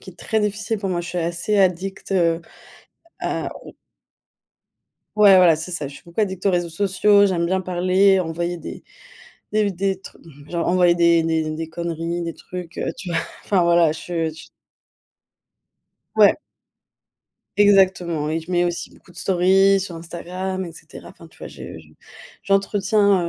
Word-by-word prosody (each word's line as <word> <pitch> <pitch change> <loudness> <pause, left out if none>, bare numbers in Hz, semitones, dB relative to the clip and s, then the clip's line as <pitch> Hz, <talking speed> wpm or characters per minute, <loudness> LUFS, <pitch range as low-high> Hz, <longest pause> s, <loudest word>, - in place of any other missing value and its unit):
qui - - -10
est 175 - -21
très 220 -1 -1
difficile 210 +2 -2
pour 195 -2 -3
moi, 175 - -1
je 175 - -7
suis 180 - -6
assez 170 +5 -1
addict, 190 0 0
heu, 170 -3 +2 0.8
à - - -3
au - - -12 1.4
Ouais, 205 -2 +7
voilà 175 -3 +6
c'est 165 +3 -6
ça, 150 -5 -3
je 140 - -12
suis - - -14
beaucoup 170 +5 -4
addict 190 -2 -2
aux - - +5
réseaux 175 -2 0
sociaux, 200 +3 +3
j'aime 175 -3 0
bien 190 +1 0
parler, 185 +2 +3
envoyer 170 +1 -3
des 165 - -9 0.7
des 215 0 +2
v 200 - 0
des 190 0 -2
trucs - - -13 0.3
genre 170 -1 -2
envoyer 175 -1 +3
des 170 -1 +4
des 160 -1 0
des 160 0 -5
conneries, 170 +1 -4
des 165 -1 -4
trucs, 180 -2 -9
heu, - - -2
tu 185 - -7
vois? 170 - 0 0.3
Enfin 195 -3 +2
voilà, 170 -2 +4
je 160 - -8 0.3
ch 155 - -13 1.7
Ouais. - - +6 1.2
Exactement. 185 -6 +3
Et 160 +1 -1
je 160 - -12
mets 175 -1 +2
aussi 175 -1 -3
beaucoup - - -21
de 175 - -18
stories 190 +2 +3
sur 185 -2 -6
Instagram, 180 +3 -5
et 170 - -8
cetera. - - -13
Enfin - - -14
tu - - -22
vois, - - -8
je - - -10
je 80 - -19 0.6
j'entretiens 200 -2 +2
180 Hz, 175 wpm, -21 LUFS, 170-195 Hz, 1.7 s, Ouais